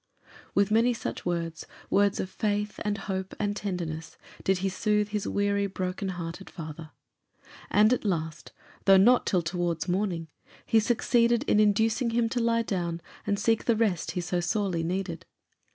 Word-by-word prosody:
With 200 +1 +3
many 230 +2 +4
such 215 - -5
words 165 -2 -3 0.2
words 200 0 +3
of - - -1
faith, 210 +1 -2
and 210 -1 -1
hope, 190 -1 -3
and 205 0 0
tenderness 170 -5 -4 0.3
did 190 0 +2
he - - +3
soothe 210 +2 +1
his 210 -1 -2
weary, 200 0 +1
broken 185 +1 -3
hearted 175 +1 -6
father. 160 -1 -8 0.8
And 215 +3 +5
at - - -1
last, 160 -6 -3 0.3
though 195 -1 +8
not 240 +6 +5
till 180 -3 +2
towards 175 0 -2
morning, 180 -3 -1 0.4
he 225 - +4
succeeded 235 +1 +2
in 210 - +2
inducing 220 +3 +3
him 230 0 +1
to 245 - -1
lie 230 0 +2
down 175 -5 -2 0.3
and 205 -1 +1
seek 225 +2 +1
the 235 - +3
rest 200 -8 0
he 180 - -1
so 175 +1 -1
sorely 175 0 0
needed. 175 0 -3
200 Hz, 165 wpm, -28 LUFS, 175-215 Hz, 0.8 s, though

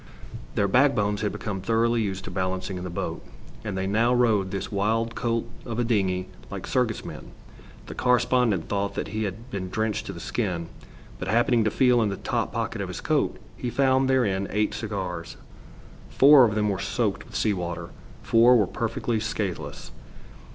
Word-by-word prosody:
Their 100 - +2
backbones 105 -4 +3
had 105 - 0
become 100 -3 -4
thoroughly 115 +3 +2
used 95 -3 -3
to - - -7
balancing 95 0 -2
in - - -6
the 90 - -4
boat, 85 - -4 0.4
and 105 -3 -4
they 95 - -1
now 110 +5 +2
rode 110 -6 +3
this 95 0 -4
wild 110 +3 0
colt 115 0 -1 0.2
of 115 -2 -5
a 120 - +2
dingey 95 -5 0 0.2
like 100 -2 -6
circus 125 -4 0
men. - - -9 0.5
The - - -7
correspondent 125 -6 +2
thought 100 0 -1
that - - -3
he 110 0 -2
had 110 +6 -7
been 95 -2 -4
drenched 110 +3 -1
to - - -3
the 85 - -8
skin, 90 -6 -2 0.5
but - - -4
happening 120 0 +3
to - - +3
feel 125 +1 +3
in 110 - +2
the 100 - -4
top - - -2
pocket - - -2
of - - -3
his - - -6
coat, - - 0 0.2
he 125 - -3
found 130 +1 +2
therein 100 -7 +2
eight 105 +1 0
cigars. 95 -6 -4 0.7
Four 140 -1 +7
of 105 -3 0
them 105 -1 +1
were 95 - -1
soaked - - -1
with - - -14
sea 105 - +2
water; 85 -2 -4 0.3
four 120 +2 +6
were 105 - +3
perfectly 115 +4 -2
scathless. 105 -4 -4
105 Hz, 185 wpm, -26 LUFS, 95-115 Hz, 0.7 s, Four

